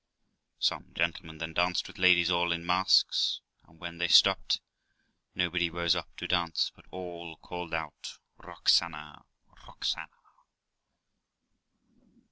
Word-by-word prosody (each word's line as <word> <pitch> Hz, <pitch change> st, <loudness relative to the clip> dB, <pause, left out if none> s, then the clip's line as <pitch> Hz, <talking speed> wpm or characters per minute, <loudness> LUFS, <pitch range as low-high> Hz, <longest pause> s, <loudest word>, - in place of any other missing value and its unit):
Some -, -, -2 dB
gentlemen 80 Hz, -1 st, -2 dB
then 80 Hz, +1 st, -6 dB
danced 90 Hz, +2 st, +1 dB
with -, -, -12 dB
ladies 90 Hz, -1 st, +5 dB
all 85 Hz, 0 st, +1 dB
in 85 Hz, 0 st, -2 dB
masks; 90 Hz, +2 st, +3 dB, 0.3 s
and, 80 Hz, -, -22 dB
when 85 Hz, -1 st, -8 dB
they 85 Hz, -, +1 dB
stopped, 80 Hz, -, +5 dB, 0.8 s
nobody 90 Hz, -1 st, 0 dB
rose 85 Hz, 0 st, +1 dB
up -, -, -4 dB
to -, -, -5 dB
dance, 85 Hz, -2 st, 0 dB
but -, -, -21 dB
all 85 Hz, -3 st, -8 dB
called 90 Hz, 0 st, -8 dB
out 80 Hz, -2 st, -6 dB, 0.2 s
'Roxana, 75 Hz, -3 st, 0 dB, 0.4 s
Roxana!'. -, -, -3 dB
85 Hz, 115 wpm, -29 LUFS, 80-90 Hz, 0.8 s, ladies